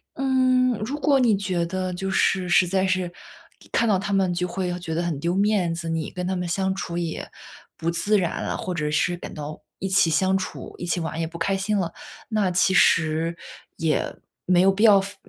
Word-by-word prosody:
嗯， 255 -1 +2
如 260 +8 -4
果 285 -2 +3
你 230 -6 +3
觉 185 -4 -1
得 185 +1 -3
就 195 +2 -3
是 190 -1 +1
实 180 +1 +5
在 190 +1 +1
是 185 -2 0 0.6
看 235 - +2
到 200 - +3
他 195 +2 -4
们 190 -2 +2
就 180 +1 -1
会 180 +1 -3
要 175 0 -2
觉 170 -2 -5
得 165 - 0
很 170 -4 -2
丢 170 +4 -1
面 200 -4 +2
子， 165 0 -4
你 165 -1 -2
跟 180 0 -5
他 190 - -1
们 180 -1 -3
相 190 +2 0
处 170 -3 -4
也 170 -2 -4 0.5
不 165 - -2
自 205 +5 +3
然 175 -4 -1
了， - - -2
或 185 - -4
者 150 -3 -2
是 175 +3 +1
感 175 - -9
到 150 0 -7 0.2
一 195 - -2
起 190 -3 +4
相 190 +4 +2
处、 190 - -7
一 - - -5
起 175 +1 0
玩 160 -1 -4
也 165 - 0
不 170 +1 -8
开 195 +4 0
心 200 +2 0
了。 175 -4 -2 0.3
那 210 -4 0
其 190 +1 +3
实 165 -1 +3 0.4
也 160 -2 0 0.3
没 180 -1 +3
有 190 - +5
必 200 +3 -1
要 210 -3 +7
非 200 +1 -5
185 Hz, 240 characters per minute, -24 LUFS, 170-195 Hz, 0.6 s, 要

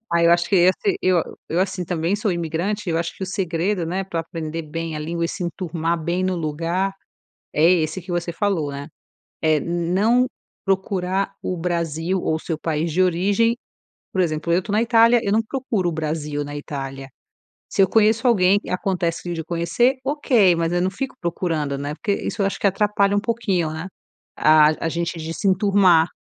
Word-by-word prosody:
Ai 170 0 +4
eu - - +5
acho 175 0 +2
que 195 - +3
esse 185 - +3
eu 180 -3 +3 0.3
eu 170 - -1
assim, 190 -1 -1
também 170 +2 -1
sou 210 0 -1
imigrante, 170 +5 -2
eu 165 - +1
acho 170 0 -3
que - - -8
o - - -2
segredo, 180 0 -1
né, 185 +3 -2
pra 170 -3 -3
aprender 165 -1 -5
bem 165 +1 -5
a - - -3
língua 170 +2 -2
e - - -1
se 185 - -5
enturmar 170 -1 -2
bem 175 +3 -1
no 185 -1 0
lugar, 170 +5 -1 0.6
é 150 - +1
esse 165 0 +1
que 180 - -10
você 175 0 -2
falou, 175 -7 0
né? 140 +1 -6 0.5
É 155 -1 +3
não 185 - +1 0.4
procurar 190 0 0
o 180 - -2
Brasil 170 +1 -1
ou 160 - 0
o - - -3
seu 160 -1 -4
país 160 0 -2
de 180 +5 +2
origem, 200 +6 +2 0.6
por 190 - 0
exemplo, 160 0 -1
eu 180 +2 +3
tô 205 - -8
na 215 - +3
Itália, 230 0 +5
eu 200 - 0
não 225 - +3
procuro 225 -6 -2
o - - -1
Brasil 150 -2 -3
na 145 0 -6
Itália, 135 -2 -6 0.6
se - - -1
eu 190 - +4
conheço 225 +3 +3
alguém 200 -4 +4
acontece 175 -2 -1
de 165 -2 -4
conhecer, 175 - +1
ok, 250 - +3
mas 165 0 0
eu 175 0 +1
não 185 - +1
fico 260 +8 -5
procurando, 160 -5 -2
né, 145 +2 -4
porque 205 +3 -2
isso 210 - -2
eu 195 - +2
acho 195 - -2
que - - +1
atrapalha 200 0 +2
um 205 - +2
pouquinho, 200 -8 0
né? 160 +3 -5 0.5
A 155 +1 +4
a - - +2
gente 170 +1 -3
de 160 0 -5
se 200 - -3
enturmar. 185 -4 +4
175 Hz, 200 wpm, -22 LUFS, 165-195 Hz, 0.6 s, eu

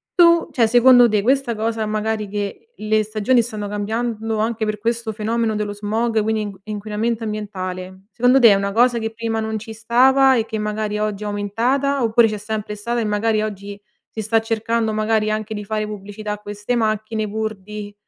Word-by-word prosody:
Tu 340 -1 +5
cioè 230 -3 +3
secondo 245 +1 +6
te 210 -1 +1
questa 260 -1 +1
cosa 220 0 -1
magari 215 0 -2
che 205 - -5
le 215 0 +1
stagioni 215 +4 +2
stanno 215 -3 -5
cambiando 220 +2 -2
anche 220 +1 -1
per 215 0 -1
questo 230 +1 -2
fenomeno 220 +1 -1
dello 210 -1 -2
smog 220 +2 0
quindi 220 0 0
in 205 -1 -4
inquinamento 215 +2 -3
ambientale, 190 -3 -5
secondo 250 +2 +4
te 235 -3 +8
è - - +7
una 200 0 -1
cosa 240 +2 +3
che 225 0 -3
prima 225 0 -3
non 220 0 -2
ci 220 +1 -8
stava 260 +4 +4
e 225 -2 +1
che 220 -1 -4
magari 210 0 -2
oggi 210 -1 -2
è - - -4
aumentata, 240 +7 0
oppure 230 0 +4
c'è 215 -1 -3
sempre 210 0 -4
stata 235 +3 -2
e 225 - -1
magari 215 +1 +1
oggi 200 -1 -6 0.3
si 220 - -6
sta 225 +2 +2
cercando 225 0 -1
magari 215 0 +1
anche 215 0 -3
di 210 0 -6
fare 215 0 -2
pubblicità 210 +1 -6
a - - -5
queste 210 +3 -4
macchine 215 -1 -1
pur 220 +1 -3
di 205 +1 -9
215 Hz, 195 wpm, -20 LUFS, 210-230 Hz, 0.3 s, te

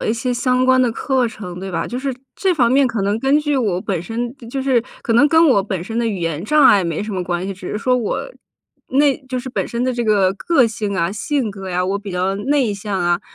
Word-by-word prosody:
了 - - -2
一 220 - +3
些 245 +2 -2
相 250 +1 +1
关 260 0 +4
的 250 -2 +3
课 255 +1 0
程， 180 -5 -8
对 195 - -5
吧？ 165 -2 -2
就 245 - -4
是 270 -1 -3 0.2
这 380 -2 +1
方 245 -5 +3
面 275 0 +4
可 230 -4 -2
能 200 +2 0
根 270 +3 +3
据 295 -1 -1
我 215 -9 0
本 185 -2 -2
身 235 +6 -4
就 270 +2 -3
是 260 -4 +2 0.2
可 230 - -1
能 265 +6 +5
跟 325 +2 +5
我 200 -6 +4
本 190 -3 -4
身 225 +3 -4
的 235 - +1
语 210 -4 -2
言 165 -2 -2
障 300 +8 +3
碍 205 -6 +6
没 170 +1 -2
什 210 0 -5
么 185 -1 -2
关 175 +1 -3
系， 195 - -3
只 185 -1 -9
是 - - -2
说 250 +4 +1
我 240 -4 -2 0.6
那 280 +1 +3
就 260 -1 -3
是 260 +1 -6
本 - - -2
身 240 +1 -2
的 255 - 0
这 240 -1 -2
个 205 -4 +3
个 265 - +2
性 210 -3 -3
啊， 170 +2 0
性 255 +1 -1
格 195 -2 -7
啊， 180 0 0
我 195 +2 -1
比 200 -1 -8
较 185 +2 -1
内 255 0 +1
向 200 -1 -4
啊， 175 0 +1
225 Hz, 290 characters per minute, -19 LUFS, 190-255 Hz, 0.6 s, 碍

